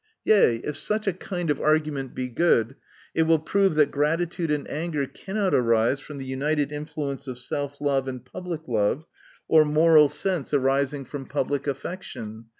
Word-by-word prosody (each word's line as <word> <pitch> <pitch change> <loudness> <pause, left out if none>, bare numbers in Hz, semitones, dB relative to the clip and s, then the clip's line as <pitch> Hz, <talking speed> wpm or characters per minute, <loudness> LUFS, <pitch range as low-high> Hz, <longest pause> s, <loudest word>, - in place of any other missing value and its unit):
Yea, 205 - +5
if 150 - -3
such 215 0 -1
a 195 - +1
kind 175 -2 -3
of 145 - -2
argument 150 -4 0
be 130 - -2
good, 125 -2 +2 0.4
it 160 - +2
will 160 0 +4
prove 195 +3 +1
that 150 -2 +4
gratitude 165 +3 0
and 150 -1 -1
anger 150 -2 -2
cannot 195 +6 -2
arise 115 +2 +3
from 145 +1 -10
the 135 - -6
united 145 +2 -1
influence 145 -2 -5
of 130 -2 -5
self 140 +3 -4
love, 140 -2 +1
aiicl 130 -1 -6
public 165 +3 -6
love, 115 +6 0 0.4
or 160 -1 +6
moral 155 0 +5
sense 175 -6 -2
arising 135 +1 +1
from 135 +2 -7
the - - -21
public 145 0 -1
affection. 120 - -6
145 Hz, 170 wpm, -25 LUFS, 135-160 Hz, 0.4 s, or